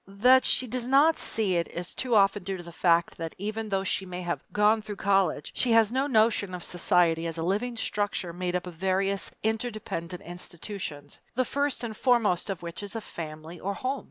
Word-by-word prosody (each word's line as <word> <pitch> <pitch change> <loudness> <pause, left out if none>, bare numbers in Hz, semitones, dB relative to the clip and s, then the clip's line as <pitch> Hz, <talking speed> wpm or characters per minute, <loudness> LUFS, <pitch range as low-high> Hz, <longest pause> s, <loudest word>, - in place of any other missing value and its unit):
That 250 +7 +5
she 255 - +4
does 245 0 -3
not 285 +5 +5
see 200 -5 0
it 170 - 0
is 175 +1 -6
too 250 -3 0
often 200 0 +4
due 190 +1 -3
to 175 - -9
the 170 - -10
fact 170 0 +2
that 165 -1 -5
even 215 +2 -4
though 195 -1 0
she 195 - 0
may 180 -1 -6
have 175 0 -2
"gone 210 +1 +3
through 210 -1 -6
college," 195 -6 +1
she 245 -2 +2
has 225 -1 +5
no 265 +3 +1
notion 215 -6 +2
of 175 - -7
society 170 -2 +2
as 165 0 -4
a 165 - -2
living 220 +7 -1
structure 205 -5 -1
made 180 0 -2
up 180 - -1
of 180 - -7
various 190 +3 0
interdependent 215 -6 -3
institutions, 175 -4 -7 0.2
the 255 +1 +2
first 285 0 -1
and 225 -2 -4
foremost 220 -7 +2
of 190 -2 -4
which 170 +2 -6
is 205 +2 -7
a - - -1
family 160 -3 -8
or 200 +3 -3
home. 265 +4 -2
195 Hz, 210 wpm, -28 LUFS, 175-225 Hz, 0.2 s, That